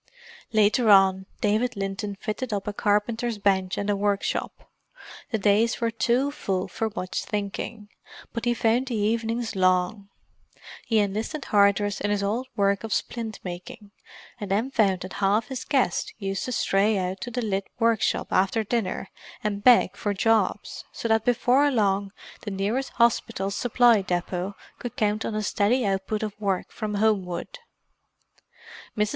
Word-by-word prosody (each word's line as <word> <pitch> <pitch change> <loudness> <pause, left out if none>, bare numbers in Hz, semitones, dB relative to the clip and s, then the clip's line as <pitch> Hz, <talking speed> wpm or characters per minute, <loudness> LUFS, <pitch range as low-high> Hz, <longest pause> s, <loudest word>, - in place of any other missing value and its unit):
Later 215 +2 +3
on, 190 -1 +5
David 220 +3 +1
Linton 195 +1 -3
fitted 215 +4 -4
up 200 -1 -3
a 210 - -2
carpenter's 225 +3 0
bench 190 -2 +1
and 205 - -2
a 205 - +2
workshop; 200 0 -2 0.6
the 230 - 0
days 210 +3 +2
were 230 -1 0
too 250 +5 +1
full 190 -9 -2
for 225 - -2
much 185 -3 -3
thinking, 210 +1 -4 0.5
but 230 +1 -3
he 240 0 +2
found 235 +3 +1
the 245 - -2
evenings 225 +2 -1
long. 185 +2 +1 0.8
He 225 - +2
enlisted 215 +8 -1
Hardress 205 0 +2
in 205 - 0
his 205 -1 0
old 225 +6 -1
work 200 -1 +1
of 220 -3 -1
splint 225 -3 -4
making, 180 +3 -8 0.5
and 205 -3 -5
then 220 +7 0
found 195 -7 +2
that 185 - -7
half 205 +3 +2
his 260 -1 -4
guests 255 -11 0
used 195 -2 -3
to 255 - -4
stray 205 -2 +2
out 185 +2 -3
to 240 - -4
the 245 +1 -3
lit 195 -2 -1
workshop 230 -2 +1
after 195 +4 +2
dinner 210 -3 -2 0.4
and 205 -1 -2
beg 245 0 +6
for 205 -1 -2
jobs, 210 -1 +1
so 230 - -4
that 220 0 +2
before 250 +4 +3
long 200 -5 +1 0.3
the 210 - -5
nearest 205 +7 -1
Hospital 230 -4 +1
Supply 240 0 +4
Depot 180 +1 -3 0.2
could 245 - -6
count 210 0 0
on 215 - -3
a 215 - -1
steady 215 +5 +1
output 195 +2 -1
of 210 -2 -3
work 195 -3 -1
from 215 -2 -4
Homewood. 200 - -1 1.4
Mrs. 210 0 +2
210 Hz, 160 wpm, -25 LUFS, 195-230 Hz, 1.4 s, beg